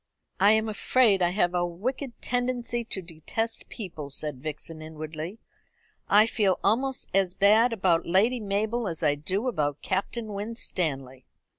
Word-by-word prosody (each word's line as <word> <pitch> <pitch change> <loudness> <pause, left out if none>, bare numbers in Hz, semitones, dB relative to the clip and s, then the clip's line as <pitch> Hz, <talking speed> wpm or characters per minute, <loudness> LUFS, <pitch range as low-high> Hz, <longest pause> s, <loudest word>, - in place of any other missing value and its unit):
"I 200 +3 +6
am 220 0 +2
afraid 215 -1 +3
I 175 - +4
have 175 -1 +1
a 175 0 +1
wicked 235 +9 -4
tendency 245 -1 -1
to 190 -4 -4
detest 175 +8 -4
people," 165 - -6
said 145 -2 -4
Vixen 155 +1 -6
inwardly. 155 +4 -6 0.7
"I 210 +2 +7
feel 205 -5 +1
almost 260 +6 +1
as 190 -2 +2
bad 215 +5 +5
about 185 -6 +1
Lady 215 +8 +3
Mabel 215 +3 -1
as 165 -2 -4
I 150 -2 +4
do 185 - -2
about 150 - -1
Captain 210 +3 -2
Winstanley." 160 - -3
195 Hz, 145 wpm, -27 LUFS, 165-225 Hz, 0.7 s, I